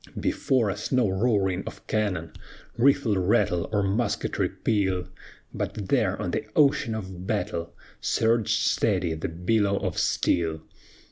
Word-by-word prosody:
"Before 120 -7 +1
us 105 +3 -5
no 125 -4 +3
roaring 95 -2 +1
of - - -9
cannon, 95 -7 -1 0.4
Rifle 125 -4 +3
rattle, 90 -3 +1
or 105 -2 +1
musketry 100 +5 0
peal; 95 -4 0 0.5
But 100 -3 -4
there - - +1
on - - -2
the - - -1
ocean 140 -6 +3
of 95 -3 -7
battle 90 -5 -2 0.2
Surged 115 -1 +2
steady 95 -6 +1
the 80 +1 -4
billow 100 +4 +1
of - - -2
steel. 80 -2 +1
100 Hz, 130 wpm, -26 LUFS, 90-110 Hz, 0.5 s, no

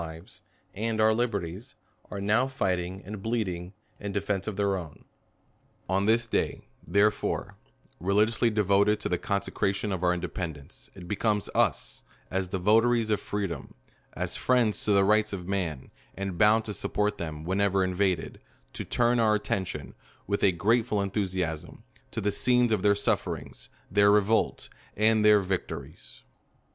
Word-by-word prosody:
lives 80 +2 -10 0.3
and 110 +2 -2
our 110 0 +5
liberties, 110 +1 -3 0.3
are 100 - -5
now 110 +6 +2
fighting 95 -7 -2
and 105 +1 -7
bleed 115 0 -1
ing 90 0 -5 0.3
in 100 -1 -4
defence 100 0 -2
of 110 - -3
their 100 0 +1
own. 85 -5 -8 0.8
On 95 +2 +1
this 115 +1 +3
day, 115 - -2 0.2
therefore, 100 +5 +1 0.4
religiously 105 +6 +2
devoted 105 0 +3
to - - -2
the 90 - 0
consecration 100 0 -1
of 95 -2 -3
our 90 - +4
independence, 85 -3 -5
it 90 -3 -10
becomes 105 +1 0
us, - - 0 0.3
as 95 0 -1
the 95 - -2
votaries 110 +4 +3
of 105 - +2
freedom, 100 -4 -4 0.4
as - - -3
friends 120 -4 +1
to 105 - +2
the 100 -1 +5
rights 110 +1 +3
of 90 -2 -5
man, 90 -9 -3 0.3
and 100 -2 -3
bound 105 +4 +4
to 105 - -4
support 105 +1 -1
them 80 -2 -5
whenever 95 +2 +1
invaded, 90 -2 -1 0.3
to - - -4
turn' 120 0 +2
our 110 -2 +4
attention, 95 -9 -3 0.3
with 100 +1 -1
a 100 - +6
grateful 110 +4 +1
enthusiasm, 95 -5 -3 0.3
to - - -4
the 105 - 0
scenes 125 +3 +2
of 105 -4 +2
their 100 0 +4
sufferings, 100 - -2 0.2
their 100 +1 +5
revolt, 105 +2 +2 0.3
and 110 0 +3
their 105 -1 +6
victories. 95 -1 -5
100 Hz, 155 wpm, -28 LUFS, 95-110 Hz, 0.8 s, a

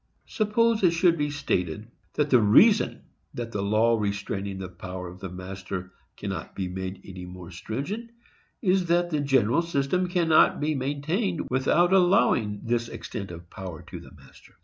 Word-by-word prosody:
Suppose 220 +1 +1
it 175 -3 +4
should 170 0 +4
be 145 -2 -1
stated 105 - -2 0.3
that 150 -1 0
the 125 -3 +6
reason 205 - +5 0.3
that 120 -1 -5
the 100 - -2
law 110 +3 +2
restraining 100 -1 -3
the 95 -1 -5
power 90 0 -7
of 90 +1 -11
the 95 - -6
master 95 0 -7 0.2
cannot - - -5
be 95 -2 -2
made 95 +1 -5
any 90 -2 -8
more 90 -1 -10
stringent 140 - -5 0.5
is, 185 -2 +2
that 175 +1 +2
the 150 - +1
general 135 -1 +3
system 170 +2 0
cannot 170 -3 +4
be 150 +1 0
maintained 150 - -1
without 170 +8 +3
allowing 175 - +3
this 120 0 0
extent 100 -3 -6
of 85 0 -11
power 90 -4 -8
to - - -9
the - - -13
master. - - -19
120 Hz, 165 wpm, -26 LUFS, -, 0.5 s, the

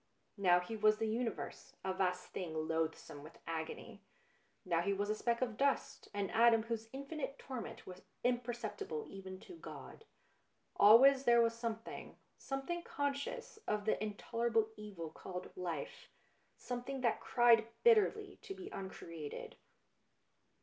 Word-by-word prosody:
Now 180 -2 +6
he 180 +5 -5
was 215 0 +4
the 225 0 0
universe, 225 0 -3
a 190 - 0
vast 180 -1 0
thing 160 -3 -3
loathsome 160 -2 -2
with 155 +3 -12
agony, 165 +7 -5 0.6
now 170 -2 +2
he 200 +3 +1
was 205 +1 0
a - - +3
speck 235 +3 +1
of 235 -4 -3
dust, 280 0 0
an 200 -2 -2
atom 230 0 +6
whose 225 -1 -4
infinite 280 +1 -5
torment 255 -4 -6
was 185 0 -9 0.2
imper 245 0 +3
ceptible 415 - -4
even 190 -1 -8
to 365 - -11
God. 445 - -10 0.7
Always 260 +6 +8
there 235 0 +6
was 230 0 +4
something 230 -1 -5 0.2
something 270 +6 -3
conscious 285 +9 -3
of 210 -1 0
the 215 - +1
in 210 -1 -3
tolerable 230 0 +1
evil 195 -7 -7
called 180 -1 -7
life, 170 -5 -5 0.5
something 250 +2 -4
that 235 -2 +1
cried 235 -2 +5 0.2
bitterly 430 -3 +4
to 390 - -7
be 385 +1 -8
uncreated. 165 -5 -7
225 Hz, 145 wpm, -36 LUFS, 190-260 Hz, 0.7 s, Always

